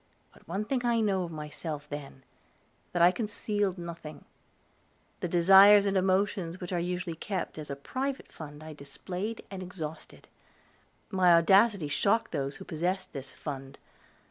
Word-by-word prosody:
But - - -21
one 195 +6 -2
thing 250 +2 -1
I 235 -1 +2
know 200 -4 +1
of 170 - -8
myself 150 -1 -6
then 140 -2 -8 0.7
that 175 -1 +2
I 175 - +8
concealed 205 -2 -2
nothing; 170 -3 -8 0.9
the - - -2
desires 195 +4 +7
and 200 -1 +1
emotions 185 -2 +1
which 180 +1 -5
are 175 - +1
usually 180 0 -3
kept 185 -2 -4
as 150 - -7
a 140 - -3
private 260 - -4
fund 150 -1 -10
I 155 0 -8
displayed 180 +9 -6
and 190 -1 -6
exhausted. 165 -4 -8 0.8
My 180 -3 +5
audacity 195 +1 +4
shocked 225 +9 +1
those 140 0 -2
who 190 - -10
possessed 185 +3 -2
this 135 -2 -6
fund. 135 -2 -7
180 Hz, 150 wpm, -29 LUFS, 155-200 Hz, 0.9 s, I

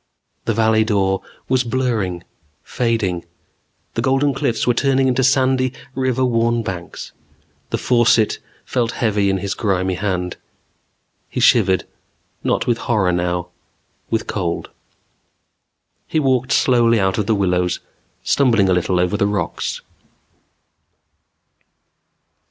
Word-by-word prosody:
The 115 - 0
Valley 110 0 +3
Dor 95 -3 +1 0.3
was 130 0 +2
blurring, 115 -8 -1 0.4
fading. 110 -8 -1 0.7
The 115 - -1
Golden 135 +3 +2
Cliffs 120 -3 -1
were 120 - +3
turning 135 +1 +2
into 130 +1 +1
sandy, 130 -1 +2 0.2
river 130 -1 0
worn 115 -1 +1
banks. 90 -4 -6 0.6
The - - -1
faucet 120 -3 +3 0.3
felt 115 -2 -1
heavy 105 -4 +1
in 95 - +1
his 100 +1 -3
grimy 95 -3 0
hand. 90 -2 -2 0.9
He - - -4
shivered, 95 -5 +4 0.6
not - - 0
with 120 -1 +1
horror 100 -6 +2
now. 90 0 -1 0.6
With 115 0 -1
cold. 85 -5 -3 1.4
He 160 - 0
walked 130 -3 +1
slowly 120 -3 +4
out 95 +1 +1
of 105 - -1
the 110 - +3
willows, 90 -2 0 0.4
stumbling 115 -8 +3
a - - +4
little 90 0 +1
over 90 +3 +1
the 100 - +2
rocks. 105 -1 -2
110 Hz, 120 wpm, -19 LUFS, 95-125 Hz, 1.4 s, shivered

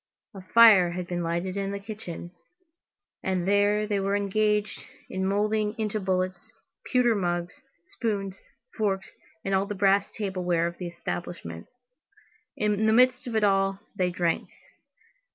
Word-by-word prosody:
A 195 - -9
fire 195 -3 +6
had 180 0 -4
been 175 0 -3
lighted 170 +3 -2
in 195 -1 -2
the 200 - -3
kitchen, 195 -5 -8 0.9
and 185 -1 -1
there 205 +1 +3
they 205 -1 0
were 195 +1 0
engaged 210 +1 0 0.3
in 190 0 -1
moulding 210 +1 0
into 215 -1 -1
bullets, 185 +1 -2 0.4
pewter 250 -2 +4
mugs, 175 +3 -2 0.2
spoons, 195 -1 -3 0.4
forks, 195 -3 -2 0.3
and 195 - -1
all 190 +1 +2
the 205 - -4
brass 195 +1 +3
table 195 -4 -4
ware 170 -1 +1
of 170 0 -4
the 180 - -4
establishment. 170 - -6 0.9
In 210 0 +1
the 220 - +4
midst 255 +2 +4
of 235 - -4
it 220 - +2
all, 195 -1 +2 0.2
they 185 -2 +1
drank. 175 -2 -1
195 Hz, 150 wpm, -27 LUFS, 180-210 Hz, 0.9 s, fire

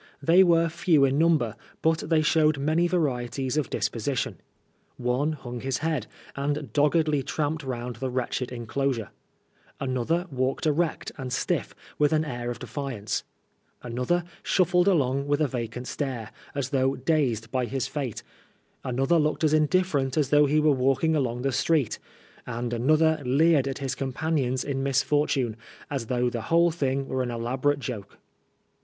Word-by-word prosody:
They 165 +6 +6
were 170 -2 +4
few 165 -3 +3
in 135 +2 +1
number, 155 -10 +2 0.3
but 160 0 +3
they 160 -2 +3
showed 155 -1 +3
many 155 +5 +2
varieties 135 -6 -1
of 150 -4 0
disposition. 125 +3 -2 0.6
One 125 +5 0
hung 125 -4 -7
his 130 +1 -2
head, 160 0 -1 0.3
and 145 +1 -2
doggedly 150 0 +3
tramped 155 +3 -2
round 125 -2 -4
the 130 - -3
wretched 125 0 -2
enclosure; 120 -1 -2 0.7
another 135 +7 0
walked 130 +2 -1
erect 155 +2 0
and 130 -1 -5
stiff, 125 - -1 0.2
iBidth 150 0 +3
an 155 0 +2
air 120 -4 -4
of 120 - -4
defiance; 125 -3 -4 0.6
another 125 +9 0 0.2
shuffled 180 0 +2
along 140 -6 +2
with 145 0 +1
a 155 - +2
Tacant 120 -1 -4
stare, 130 -6 -4 0.2
as 140 -1 -2
though 135 -1 +2
dazed 125 -6 0
by 130 -1 0
his 130 +1 -2
fate; 135 -7 -4 0.6
another 135 +6 +2
looked 155 +1 0
as 155 -1 +3
indifferent 155 -4 +2
as 145 -4 +2
though 145 0 +6
he 150 +2 +3
were 150 0 +4
walking 135 +4 +2
along 125 -4 -1
the 135 - +1
street; 145 -1 +1 0.5
and 120 0 -3
another 155 +6 +3
leered 140 +2 +3
at 135 - -3
his 135 -2 -2
companions 135 -1 -1
in 135 -1 -2
misfortune, 135 -3 +1 0.4
as 135 -5 -3
though 125 0 +1
the 120 -1 -2
whole 170 +1 +4
thing 135 -4 -1
were 130 - -1
an 125 - -2
elabo 120 +3 -4
rate 145 -1 +1
joke. 120 -7 -6
140 Hz, 160 wpm, -26 LUFS, 125-155 Hz, 0.7 s, They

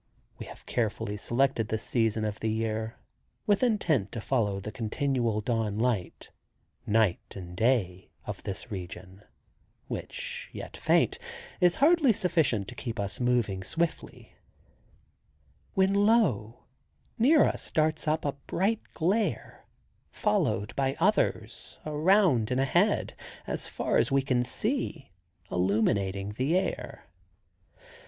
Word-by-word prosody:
We - - -7
have - - -12
carefully 105 -3 -2
selected 120 +1 +1
this 110 0 -3
season 110 -2 0
of 105 -1 -3
the 110 - -1
year, 110 0 -2 0.5
with 205 -2 +3
intent 175 - +1
to 115 - -3
follow 105 -5 0
the 105 +2 -6
continual 120 -2 -1
dawn 110 -2 -1
light—night 110 -2 -2
and 90 -2 -8
day—of 95 -5 -1
this 100 +4 -6
region, 95 0 -8 0.7
which - - -6
yet - - -8
faint, - - +2 0.4
is 180 -2 +4
hardly 300 -3 +5
sufficient 155 - +1
to - - -8
keep 120 -2 -5
us 100 -1 -3
moving 120 -6 +1
swiftly, 165 - -3 1.4
when, 190 0 +3
lo, 200 - +2 0.6
near 290 +6 +6
us - - -2
darts 155 0 +1
up 155 0 +1
a 145 - +1
bright 190 +10 -1
glare, 195 +7 -1 0.4
followed 145 - 0
by 135 0 0
others, 165 - 0
around 155 - +3
and 125 - 0
ahead, 175 +10 +2 0.3
as - - -3
far - - 0
as 115 +2 +1
we 135 0 +3
can 125 -2 +1
see, 165 - -2 0.4
illumining 100 +1 +1
the 150 +7 +2
air. 190 - -3
125 Hz, 120 wpm, -28 LUFS, 105-170 Hz, 1.4 s, near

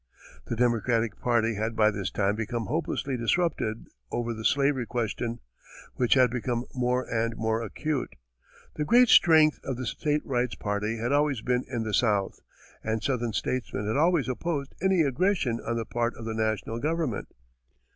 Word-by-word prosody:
The - - -2
Democratic 115 -1 +1
party 115 -2 +1
had 110 +2 -2
by 110 -1 +4
this 100 -3 -3
time 100 0 0
become 115 +1 -3
hopelessly 140 -3 -2
disrupted 120 -3 0 0.3
over 120 0 -2
the 110 0 -7
slavery 140 -1 +2
question, 120 0 -3 0.5
which 125 0 +2
had 130 -3 +5
become 120 0 -2
more 125 0 0
and 115 0 -1
more 110 +1 0
acute. 140 +5 -3 0.6
The 150 - 0
great 240 +9 +5
strength 155 -2 +6
of 130 -3 -3
the 130 - -4
state 150 +5 -1
rights 125 -2 -1
party 105 +2 -2
had 120 +3 -2
always 145 -4 +2
been 125 0 0
in 120 -3 -3
the 110 -1 -4
South, 105 -5 +1 0.4
and 110 -1 -2
southern 120 -4 -1
statesmen 120 -5 -2
had 110 - -1
always 165 -2 +3
opposed 140 +2 -3
any 190 -2 +3
aggression 140 - +1
on 115 - -2
the 115 -1 -2
part 120 +2 -1
of 115 - -9
the 115 - -3
national 110 +1 -1
government. 155 -5 -1
120 Hz, 165 wpm, -27 LUFS, 110-140 Hz, 0.6 s, strength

